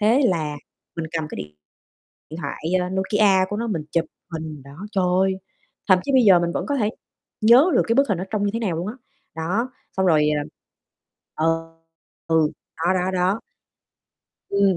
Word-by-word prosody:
Thế 225 +7 +4
là 155 -5 -1 0.4
mình 165 -1 -3
cầm 160 -2 -2
cái - - -7
điện 75 0 -7 0.8
điện 160 +2 -7
thoại, - - -4 0.2
a, 180 - -2
Nokia 190 0 +3
của 205 - -3
nó 235 +1 -2
mình 170 -8 -2
chụp 170 -1 +1 0.3
hình 155 -3 -6
đó. 140 +8 -10
Trời, 190 -1 +2 0.6
thậm 185 -1 +7
chí 280 - -2
bây 260 -1 +6
giờ 190 -5 +7
mình 170 0 0
vẫn - - -2
có 285 - -1
thể 215 -6 +1 0.5
nhớ 245 +11 +6
được - - +5
cái 230 - +2
bức 275 +1 +3
hình 200 - +1
nó 180 - -3
trông 210 -2 -1
như 205 - +2
thế 230 - -1
nào 195 -8 -1
luôn 170 +4 -3
á. 215 - -4 0.4
Đó, 190 +10 -1 0.3
xong 190 - +2
rồi, 155 -4 +4
à 145 - -1 0.9
ừ, 155 - 0 0.8
ừ, 160 -2 +3 0.3
đó, 180 - +4
đó, 185 0 0
đó. 185 +3 +1 1.1
Ừm, 200 -2 +3
185 Hz, 190 wpm, -23 LUFS, 165-210 Hz, 1.1 s, thậm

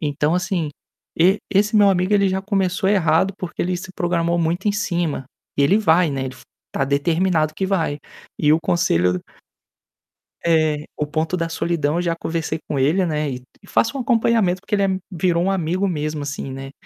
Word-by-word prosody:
Então, 150 +1 0
assim, 180 -4 -1 0.5
e 185 +5 +4
esse 205 +2 +2
meu 205 -1 +6
amigo 185 +2 +1
ele 200 -1 +4
já 190 +1 -1
começou 190 -1 0
errado 185 -1 +2
porque 180 -1 -5
ele 180 +1 -1
se 180 +1 -8
programou 170 -1 0
muito 170 +5 0
em - - +2
cima. 175 -9 -1 0.3
Ele 140 +8 +4
vai, 170 -5 +3
né, 135 -1 -2
ele 130 - -7
f - - -16 0.3
está 135 - +1
determinado 155 +3 +1
que 190 - -1
vai. 165 -7 0 0.4
E 150 0 +4
o 160 - +4
conselho 90 - +2
d 90 - -3 1.3
É, 155 -3 +2
o 150 - -1
ponto 160 +4 -1
da 165 -1 -2
solidão, 165 -2 -1
eu - - +1
já 170 -1 0
conversei 160 -1 -2
com 140 - -1
ele, 165 +8 +2
né, 150 -2 -1
e 125 -2 -6 0.2
faço 235 - +1
um - - -2
acompanhamento 225 -6 +2
porque 200 - -9
ele 200 - +3
é 190 -1 0
virou 175 -1 +1
um 195 - +1
amigo 185 +1 0
mesmo, 150 -3 -2
assim, 140 -1 -5
né. 135 +1 -7
170 Hz, 190 wpm, -21 LUFS, 150-190 Hz, 1.3 s, meu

